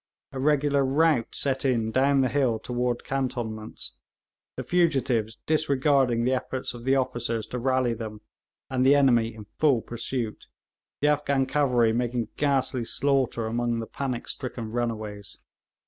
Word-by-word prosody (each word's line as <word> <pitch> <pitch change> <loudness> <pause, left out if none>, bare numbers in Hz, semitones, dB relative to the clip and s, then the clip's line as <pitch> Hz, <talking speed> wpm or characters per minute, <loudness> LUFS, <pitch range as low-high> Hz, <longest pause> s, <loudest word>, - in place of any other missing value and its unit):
A 135 - -6
regular 145 0 +2
rout 140 -2 +2
set 135 -1 0
in 115 -5 +1
down 135 +3 +3
the 130 - +3
hill 125 -3 +1
toward 120 +1 -2
cantonments, 115 - -4 0.7
the - - -3
fugitives 135 -10 +1
disregarding 140 -5 +2
the 130 +2 +2
efforts 130 0 -3
of 120 0 -10
the 135 +1 +3
officers 120 -4 -1
to 125 - -5
rally 130 -1 +1
them, 110 -2 -7 0.5
and 130 -1 0
the 135 +2 +6
enemy 120 -5 +3
in 110 -2 -10
full 140 -7 +3
pursuit, 120 -1 -4 0.5
the 145 - +3
Afghan 140 -2 +2
cavalry 125 -5 +2
making 120 -1 -1
ghastly 135 -3 0
slaughter 130 -2 0
among 120 +1 -1
the 115 - -4
panic 125 -1 -4
stricken 120 -4 -5
runaways. 110 -4 -4
125 Hz, 145 wpm, -26 LUFS, 115-135 Hz, 0.7 s, the